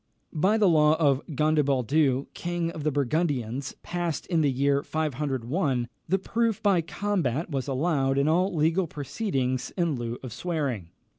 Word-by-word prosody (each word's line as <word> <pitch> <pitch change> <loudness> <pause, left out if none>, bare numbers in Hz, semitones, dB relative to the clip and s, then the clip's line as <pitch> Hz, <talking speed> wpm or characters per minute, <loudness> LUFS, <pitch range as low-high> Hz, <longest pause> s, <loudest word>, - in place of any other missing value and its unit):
By 190 +8 +2
the 210 -3 +4
law 155 -2 +5
of 145 -4 +2
Gondebaldus 140 -2 +2
king 175 -1 -2
of 160 -3 -7
the 155 - +1
Burgundians, 140 -3 -1
passed 175 -3 -3
in 170 -3 +1
the 145 - +3
year 140 +2 +2
501, 140 -3 -1 0.2
the 190 - +3
proof 225 +2 0
by 195 -4 +4
combat 170 - -2
was 135 -2 -2
allowed 135 -1 +1
in 140 +1 +2
all 180 +5 +2
legal 165 +2 +1
proceedings 140 - -2
in 170 -3 +1
lieu 120 -2 -4
of 125 -4 -6
swearing. 135 - -3
150 Hz, 150 wpm, -27 LUFS, 135-170 Hz, 0.2 s, law